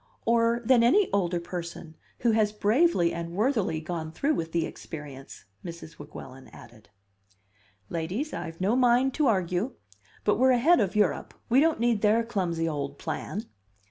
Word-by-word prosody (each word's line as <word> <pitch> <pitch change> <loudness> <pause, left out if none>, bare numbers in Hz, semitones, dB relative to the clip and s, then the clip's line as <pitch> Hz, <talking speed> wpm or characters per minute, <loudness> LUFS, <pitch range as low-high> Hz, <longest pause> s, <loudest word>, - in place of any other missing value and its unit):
"Or 235 +1 +2
than 245 0 +5
any 360 - +4
older 175 -3 +1
person 170 -2 -7 0.3
who 235 - +3
has 215 -1 +2
bravely 210 - +2
and 170 0 -5
worthily 210 - 0
gone 160 0 -5
through 280 - 0
with 165 - -3
the 165 -1 0
experience," 145 -4 -9 0.2
Mrs. 170 -2 -9
Weguelin 135 -3 -10
added. 110 -4 -16 1.0
"Ladies, 180 - -3
I've 165 0 -6
no 195 +5 +1
mind 250 +1 +3
to 300 0 +1
argue. 185 +2 0 0.5
But 210 - +2
we're 260 0 +5
ahead 310 +9 +4
of 195 -1 0
Europe; 205 -9 0
we 250 +3 +5
don't 320 -1 +3
need 235 -3 +1
their 220 +2 +3
clumsy 180 -8 -1
old 140 -2 -4
plan." 195 +7 -4
200 Hz, 155 wpm, -27 LUFS, 165-235 Hz, 1.0 s, than